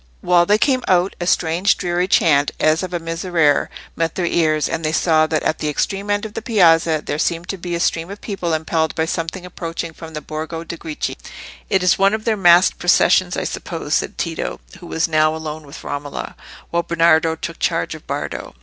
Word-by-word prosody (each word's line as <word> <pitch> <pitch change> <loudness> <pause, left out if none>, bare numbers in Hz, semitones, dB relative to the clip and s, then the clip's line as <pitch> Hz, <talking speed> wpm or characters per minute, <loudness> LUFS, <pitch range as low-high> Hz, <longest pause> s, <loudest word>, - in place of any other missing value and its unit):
While 175 -1 +3
they 210 - +4
came 255 +2 +1
out, 185 +1 +2
a 175 - -2
strange 175 +4 +2
dreary 175 0 -1
chant, 145 -6 +3
as 155 +1 +3
of 185 -1 -5
a 175 - -1
Miserere, 165 -2 +1 0.3
met 165 -1 -1
their 180 - -1
ears, 155 -3 +1
and 165 0 -3
they 155 - 0
saw 155 0 +3
that 155 0 -1
at 155 - 0
the 150 - -1
extreme 195 +6 -2
end 205 +1 0
of 215 - -7
the - - -4
piazza 165 -8 +3
there 145 - -3
seemed 170 +1 -1
to 195 - -3
be 175 0 -4
a - - -2
stream 165 0 0
of 200 +1 -8
people 195 -5 -4
impelled 160 0 -1
by 160 - +1
something 165 +3 -4
approaching 170 -2 -5
from 160 0 -10
the - - -2
Borgo 160 +2 -5
de' 170 - -6
Greci. 160 -2 -5 0.5
"It 190 -1 +2
is 180 - +3
one 195 +2 +4
of 220 - -7
their 225 - +2
masqued 175 -2 +5
processions, 175 +1 +3
I - - -1
suppose," 160 -3 -4
said - - 0
Tito, 165 -1 -3 0.2
who 175 - -11
was 165 +1 0
now 155 -1 +2
alone 155 -1 -6
with 140 - -11
Romola, 145 0 -5 0.4
while 170 - +1
Bernardo 165 -1 +3
took - - -7
charge - - 0
of - - -12
Bardo. - - -5
165 Hz, 215 wpm, -19 LUFS, 160-180 Hz, 0.5 s, masqued